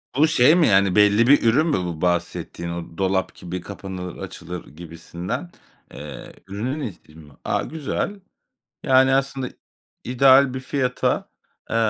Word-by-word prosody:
Bu 150 +4 +5
şey 155 0 +5
mi, 175 -3 +4
yani, 95 -2 +3
belli 105 +2 +5
bir 145 +2 +5
ürün 130 +8 +3
mü 150 - +1
bu 85 -3 -5
bahsettiğin 85 -1 -2
o 85 -1 -7
dolap 95 -1 0
gibi 90 0 -6
kapanır 95 -2 -7
açılır 90 0 -7
gibisinden? 85 - -7 0.4
Eee, 75 -1 -9
ürünün 115 +9 -3
ismi 85 -5 -14
mi? 75 -3 -15
A, - - -1
güzel. 160 +6 -4 0.6
Yani, 130 -1 +4
aslında 135 -1 -1 0.6
ideal 130 +2 +5
bir 130 - -3
fiyata, 130 -1 -1 0.4
eee, - - -2
105 Hz, 140 wpm, -22 LUFS, 90-135 Hz, 0.6 s, Bu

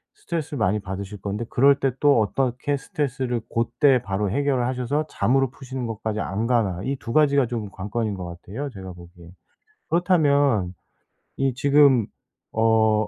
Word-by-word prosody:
스트레스를 160 -4 -4
많이 105 0 +1
받으실 100 +1 -6
건데 105 +3 -3
그럴 140 +2 +4
때 135 - +2
또 145 -4 +5
어떻게 130 +5 -1
스트레스를 130 -4 -2
고때 125 +3 +2
바로 100 0 -2
해결을 135 0 +1
하셔서 130 +4 -1
잠으로 135 +2 +1
푸시는 130 -2 -6
것까지 110 -1 -3
안 105 +5 -2
가나. 110 -8 +1
이 135 +4 -1
2 115 - -6
가지가 140 -4 +4
좀 110 -4 -4
관건인 105 +3 -3
것 95 - -6
같아요 95 +11 -6
제가 95 -4 -9
보기에. 85 -1 -14 0.6
그렇다면 145 - +2 0.6
이 135 -1 +1
지금 140 -3 +4 0.5
어 110 -1 +3
120 Hz, 325 characters per minute, -23 LUFS, 105-140 Hz, 0.6 s, 또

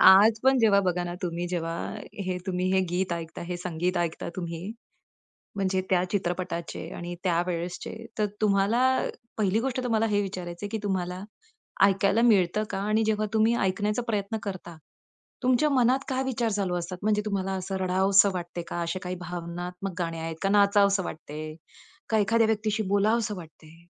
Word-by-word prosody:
आज 205 +4 +8
पण 265 0 +5
जेव्हा 210 -4 +5
बघा 180 -2 0
ना, 175 0 -4
तुम्ही 175 0 -2
जेव्हा, 165 -2 -2 0.5
हे 185 -1 -1
तुम्ही 185 0 0
हे 190 - +4
गीत 180 0 0
ऐकता, 165 -1 -5
हे 175 +1 -4
संगीत 175 +1 -2
ऐकता 170 -1 -2
तुम्ही, 170 -2 -4 1.0
म्हणजे 190 -1 +1
त्या 180 -1 +3
चित्रपटाचे 180 -3 -3
आणि 175 0 -5
त्या 170 -2 +2
वेळेसचे 175 0 -3 0.3
तर 210 - +3 0.2
तुम्हाला, 205 +3 +3 0.6
पहिली 210 0 +2
गोष्ट 255 +1 -1
तुम्हाला 225 -2 +2
हे 205 - +3
विचारायच 180 -3 -5
आहे 205 - -3
की 220 - -2
तुम्हाला 185 -1 -2 0.6
ऐकायला 195 +2 +3
मिळतं 210 -3 +4
का? - - -3
आणि 215 +2 +1
जेव्हा 215 0 +1
तुम्ही 220 +2 +4
ऐकण्याचा 205 +4 0
प्रयत्न 210 0 -1
करता, 180 -4 -6 0.7
तुमच्या 255 +4 +3
मनात 255 -1 +3
काय 260 0 0
विचार 240 -3 0
चालू 195 -3 0
असतात 175 +1 -4
म्हणजे 210 0 +2
तुम्हाला 195 -2 -1
असं 195 +1 -4
रडावसं 190 +2 +4
वाटतंय 175 -1 -4
का? 175 - -3
असे 170 +2 -2
काही 180 0 -3
भावनात्मक 180 +2 -5
गाणे 165 -1 -2
आहेत 160 0 -4
का 195 - +2
नाचावसं 200 -1 +4
वाटतंय? 155 -1 -6 0.5
का 220 - +3
एखाद्या 225 +2 +3
व्यक्तीशी 215 0 0
बोलावसं 210 +2 +2
वाटतंय? 160 0 -13
190 Hz, 165 wpm, -27 LUFS, 175-215 Hz, 1.0 s, आज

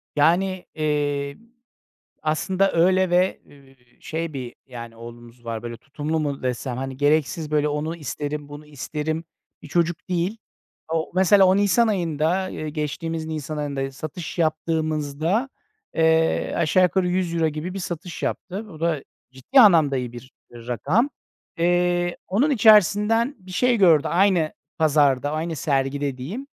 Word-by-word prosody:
Yani, 180 +5 +2
iii, 145 -2 -1 0.9
aslında 185 +5 +1
öyle 185 +2 +3
ve, 180 +2 +2
eee, 135 -2 -20 0.2
şey 165 0 -4
bir, 125 -4 -6
yani, 115 -3 -9
oğlumuz 120 +1 -12
var 115 -1 -4
böyle 120 0 -6
tutumlu 145 +6 -3
mu 145 -2 -3
desem, 125 0 -2
hani, 135 0 -5
gereksiz 150 +2 +1
böyle 150 0 +2
onu 150 +3 -2
isterim, 150 -1 -5
bunu 145 +1 -10
isterim 150 +2 -4 0.4
bir - - -10
çocuk 170 +2 -1
değil. 180 +5 -1 0.5
O 165 -1 -1
mesela, 190 +1 +5
o 185 +1 +4
nisan 205 +3 +3
ayında, 175 -1 0
eee, 155 -3 -5
geçtiğimiz 160 +2 -3
nisan 155 -1 -4
ayında, 140 -2 -3
satış 155 +6 -7
yaptığımızda, 155 - 0 0.5
eee, 160 0 +2
aşağı 170 +2 +3
yukarı 180 0 +1
100 180 -1 -1
euro 165 -1 +2
gibi 155 +4 -5
bir - - -4
satış 175 -1 -6
yaptı. 190 -1 -3
O 155 - -12
da 165 -4 0 0.3
ciddi 135 - +3
anlamda 165 - +6
iyi 125 -2 -3
bir, 125 +2 -11 0.2
iii, 120 -1 -12
rakam. 180 - +1 0.5
Eee, 175 0 +1
onun 235 +11 +2
içerisinden 220 - +4
bir 185 -1 -15
şey 245 +5 +2
gördü, 165 -7 +5
aynı 180 -4 +2 0.3
pazarda, 145 -3 +3
aynı 160 +1 -3
sergide 140 -1 -1
diyeyim. 190 - -6
155 Hz, 145 wpm, -23 LUFS, 145-180 Hz, 0.9 s, anlamda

